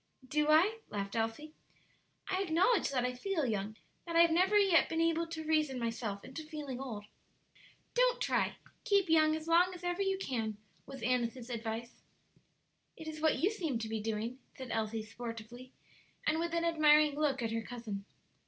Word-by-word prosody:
"Do 300 +2 +1
I?" 370 +9 +5
laughed 200 0 -4
Elsie. 225 +8 -2 0.7
"I 375 0 0
acknowledge 375 +4 +3
that 255 -3 0
I 250 - -1
feel 320 +4 -1
young 215 -2 -2 0.3
that 335 - -4
I 335 - +7
have 335 -1 +5
never 370 +5 +4
yet 390 -5 +5
been 325 - -1
able 330 0 +2
to 325 -1 -5
reason 310 -4 +1
myself 230 -4 -3
into 265 +5 -7
feeling 300 -5 -6
old." 225 -6 -6 0.9
"Don't - - +3
try; - - +1 0.3
keep 400 -3 +2
young 310 -1 +5
as 315 0 -6
long 355 +2 +4
as 355 - -12
ever 355 +2 -1
you 385 -1 +1
can," 225 - -3 0.3
was 270 0 -9
Annis's 245 0 -1
advice. 230 0 -5 1.0
"It 320 - -9
is 310 -1 -6
what 315 -1 +3
you 380 +6 +2
seem 325 - -2
to 225 -1 -4
be 220 -1 -3
doing," 225 +3 -3 0.2
said 260 -2 -7
Elsie, 220 0 -1
sportively, 235 +2 -8 0.5
and 310 +1 +2
with 340 0 -1
an 335 0 +1
admiring 305 -2 +5
look 280 -4 0
at 225 - -1
her 225 0 -1
cousin. 225 -4 -6
295 Hz, 180 wpm, -33 LUFS, 230-335 Hz, 1.0 s, I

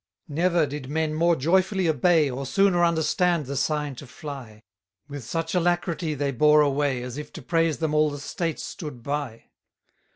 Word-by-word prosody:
193 155 +2 -3
Never 170 -4 +3
did 140 -2 -6
men 160 0 0
more 170 +2 +3
joyfully 185 +5 +2
obey, 160 -1 +3
Or 135 +1 -4
sooner 195 0 +3
understood 170 0 +2
the 140 +2 -5
sign 150 0 -1
to 140 - -10
fly: 125 -6 -9 0.4
With 145 -3 -7
such 165 +6 -3
alacrity 175 -2 0
they 140 0 -1
bore 150 +4 +5
away, 140 -3 +1
As 125 +3 -6
if 150 0 -8
to - - -8
praise 165 -3 +1
them 160 -2 -1
all 155 0 +3
the 145 - -6
States 165 +3 -3
stood 150 - -7
by. 140 -5 -4
150 Hz, 175 wpm, -25 LUFS, 140-170 Hz, 0.4 s, bore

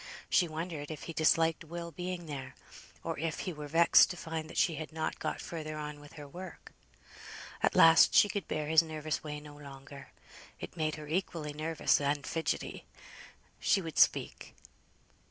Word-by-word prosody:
She 175 - +4
wondered 155 -2 -5
if 155 -2 -7
he 165 - -6
disliked 160 +1 +2
Will 170 +1 -7
being 180 +1 -5
there; 135 -4 -7 0.5
or - - -3
if 160 0 -2
he 180 - -4
were 150 -1 -7
vexed 165 +3 +6
to 180 - -5
find 160 -1 -5
that - - -9
she 170 - +3
had 155 +1 -6
not 160 0 -3
got - - -3
further 155 -2 -6
on 150 -1 -6
with 145 0 -14
her 145 -2 -10
work. 180 +5 -10 0.9
At - - +2
last 165 0 +7
she - - +7
could 200 -4 -4
bear 155 0 -2
his 160 +2 +5
nervous 155 -2 -4
way 150 -1 -5
no 150 0 -12
longer, 140 -1 -11 0.5
it - - -8
made 155 -2 -1
her 150 -1 -9
equally 160 -2 -2
nervous 155 0 +1
and 140 -1 0
fidgetty. 165 -1 -3 0.7
She 200 - +3
would 165 -4 -4
speak. - - +2
155 Hz, 175 wpm, -31 LUFS, 150-165 Hz, 0.9 s, last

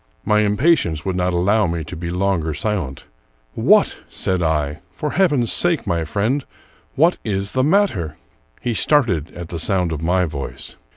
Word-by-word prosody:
My 105 0 +3
impatience 105 - +2
would 95 -2 -1
not 90 0 0
allow 100 +4 +2
me 85 -1 -3
to 80 +4 -8
be 85 +1 -5
longer 90 -4 -1
silent. 90 -10 -3 0.3
" - - -40 0.2
What," - - +5
said 95 -1 0
I, 75 -2 0
" - - -39
for 150 - -2
heaven's 145 - +2
sake, 175 -3 +2
my 85 -1 -1
friend, 110 - -1 0.3
— - - -34
what 165 +5 +3
is 100 -2 -2
the 130 - +1
matter?" 140 - +1 0.4
He 120 - -1
started 105 - +2
at 85 -1 -7
the 85 - -4
sound 90 0 +1
of 80 -2 -4
my 90 +2 +2
voice. 75 -4 -7
95 Hz, 180 wpm, -20 LUFS, 80-115 Hz, 0.4 s, What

